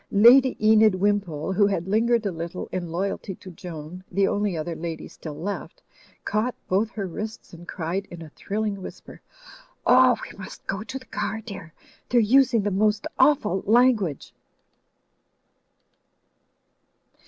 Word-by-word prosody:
Lady 245 +5 +6
Enid 215 -1 +5
Wimpole, 190 -4 0
who 200 +1 +4
had 190 -3 -2
lingered 230 +2 +2
a 200 - 0
little 170 +1 -6
in 175 -2 -3
loyalty 190 +2 -3
to 185 - -12
Joan, 170 0 -9
the 195 +1 +2
only 205 -4 -1
other 165 +2 -4
lady 165 0 -5
still 155 -3 -9
left, 205 - -6 0.4
caught 220 +3 0
both 200 +4 +1
her 210 -4 -5
wrists 215 +4 -7
and 175 +1 -12
cried 185 +4 -3
in 170 -1 -9
a 155 - -12
thrilling 205 +1 -3
whisper, - - -10 0.6
"Oh, 255 -1 +6
we - - -9
must 190 - -10
go 195 +1 -3
to 220 +5 -6
the 260 - -12
car, 220 -3 -3
dear 200 -7 -9
I - - -29 0.2
They're 245 - +4
using 235 0 +4
the 205 - 0
most 210 +2 +1
awful 260 -8 +3
language 220 - +2
200 Hz, 150 wpm, -24 LUFS, 180-220 Hz, 0.6 s, Lady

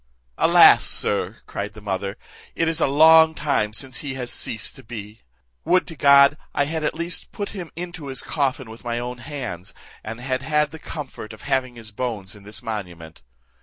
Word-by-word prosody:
"Alas! - - +7
sir," - - 0
cried 105 +2 -5
the - - -9
mother, 100 0 -3 0.4
"it 165 - +1
is 165 0 -1
a - - +4
long 160 +3 +7
time 140 -8 0
since 130 +3 -3
he 140 -3 -5
has 125 -2 -4
ceased 110 -2 -2
to 135 - -11
be: 110 -2 -9 0.4
would 185 0 +3
to 165 - -9
God 140 +1 +6 0.2
I 140 - +2
had 160 +1 -3
at - - 0
least 170 +1 -4
put 205 -2 -4
him 180 -5 -7
into 175 -3 -7
his 130 -1 -4
coffin 130 -5 -1
with 115 - -12
my 120 -1 -2
own 120 +1 -5
hands, 125 - -6 0.3
and 110 +2 -6
had 130 +1 -2
had 150 +2 +1
the 160 - -9
comfort 145 -9 -7
of 110 - -13
having 130 -2 -1
his 115 -2 -11
bones 105 -4 -4
in 105 - -14
this 105 +4 -9
monument! 90 -8 -6
130 Hz, 195 wpm, -23 LUFS, 110-150 Hz, 0.4 s, Alas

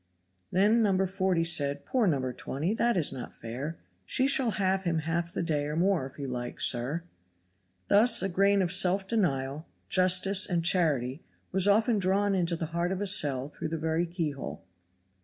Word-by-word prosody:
Then 210 +5 +3
No. 215 - +2
140 190 -2 0
said, 145 -4 +1
"Poor 245 -5 0
No. 160 - +2
120! 135 - -3
that 235 -1 +1
is 155 -5 +1
not 130 -2 -8
fair; 130 +8 -6 0.3
she 255 - +1
shall 270 -3 +3
have 190 -2 0
him 170 -3 -1
half 165 +2 -2
the - - -3
day 150 -3 -1
or 150 +1 -4
more 175 -4 +1
if 135 - -17
you 140 -2 -5
like, 120 -1 -6
sir." 135 +7 +1 0.8
Thus 210 0 +5
a - - +1
grain 195 +2 +2
of 175 - -2
self 190 +1 +3
denial, 150 - -1 0.2
justice 185 +2 +2
and 170 -2 -1
charity 150 -6 +1 0.3
was 190 +1 +2
often 220 +2 +3
drawn 195 +2 +1
into 175 -2 0
the 165 - -4
heart 170 +1 -1
of 190 - -3
a 205 - -2
cell 140 -8 +2
through 155 - -6
the 165 - -3
very 160 +2 -1
keyhole. 160 -6 -5
175 Hz, 180 wpm, -28 LUFS, 150-195 Hz, 0.8 s, Thus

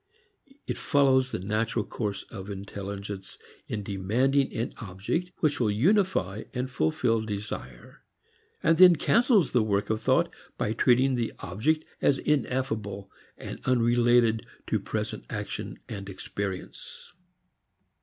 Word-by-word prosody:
It - - -3
follows 130 -2 +3
the - - -3
natural 110 +4 -1
course 105 -3 -3
of 100 -2 -7
intelligence 100 0 -6 0.3
in 105 -2 -3
demanding 120 +9 +1
an 115 - -3
object 105 - -3
which 150 -3 +2
will 115 -4 +2
unify 130 - +1
and 125 +1 -2
fulfil 115 +5 +1
desire, 100 - -6 0.6
and 165 0 +4
then 180 -2 +9
cancels 215 - +3
the 125 - +3
work 100 -1 0
of 110 - -1
thought - - +2 0.2
by 105 - 0
treating 130 +3 +4
the 120 -2 -1
object 145 - -1 0.2
as 140 - +4
ineffable 115 -9 -1 0.3
and - - -7
unrelated 120 -2 +3 0.2
to - - 0
present - - -4
action - - -5
and 100 -2 -6
experience. 95 - -6
115 Hz, 125 wpm, -27 LUFS, 100-130 Hz, 0.6 s, then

